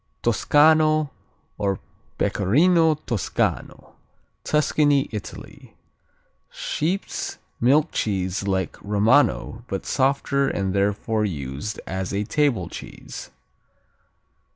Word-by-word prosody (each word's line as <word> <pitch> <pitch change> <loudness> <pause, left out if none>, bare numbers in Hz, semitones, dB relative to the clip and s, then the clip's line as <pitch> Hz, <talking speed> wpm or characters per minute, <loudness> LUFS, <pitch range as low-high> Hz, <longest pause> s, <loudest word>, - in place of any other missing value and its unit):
Toscano, 155 +5 +4 0.5
or 100 -2 0 0.4
Pecorino 155 - +3
Toscano 120 - -3 0.5
Tuscany, 145 -2 +2
Italy 105 -3 -9 0.7
Sheep's - - -3 0.2
milk 140 +6 +3
cheese 95 -1 -1
like 95 -1 -1
Romano 105 - +2
but 95 -5 -4
softer, 140 +1 +1
and 95 -6 -1
therefore 105 +2 0
used 75 0 -4
as 95 0 -3
a 100 - 0
table 115 - +1
cheese. - - -9
110 Hz, 80 wpm, -23 LUFS, 100-150 Hz, 0.7 s, Toscano